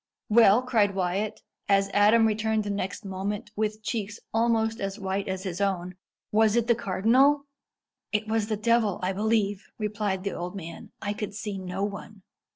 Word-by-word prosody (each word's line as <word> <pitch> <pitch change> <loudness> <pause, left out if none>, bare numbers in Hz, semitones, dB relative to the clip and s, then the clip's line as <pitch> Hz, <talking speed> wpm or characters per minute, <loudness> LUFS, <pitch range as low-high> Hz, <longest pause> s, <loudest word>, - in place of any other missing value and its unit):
"Well!" 225 +1 +6
cried 215 -6 +2
Wyat, 190 +3 -2 0.3
as 195 0 +3
Adam 215 +3 +5
returned 220 0 +1
the 205 - -3
next 200 +1 -4
moment, 200 +2 -4
with 215 0 -2
cheeks 210 -2 -3
almost 225 0 +1
as 195 +1 -3
white 195 -1 -2
as 190 0 -3
his 185 -1 -4
own 185 -2 -1 0.4
"was 220 0 +4
it 235 -1 +2
the 235 - +4
cardinal?" 235 +7 +3 0.7
"It 215 0 0
was 220 -1 0
the 215 -1 -1
devil, 220 -2 +2
I 185 +1 0
believe!" 210 -1 0
replied 210 -3 -2
the 200 - -2
old 180 +2 -5
man. 170 -3 -8
"I 205 0 -1
could 205 -1 -5
see 210 -2 -4
no 185 +1 -4
one." 205 0 -6
210 Hz, 170 wpm, -27 LUFS, 195-220 Hz, 0.7 s, Well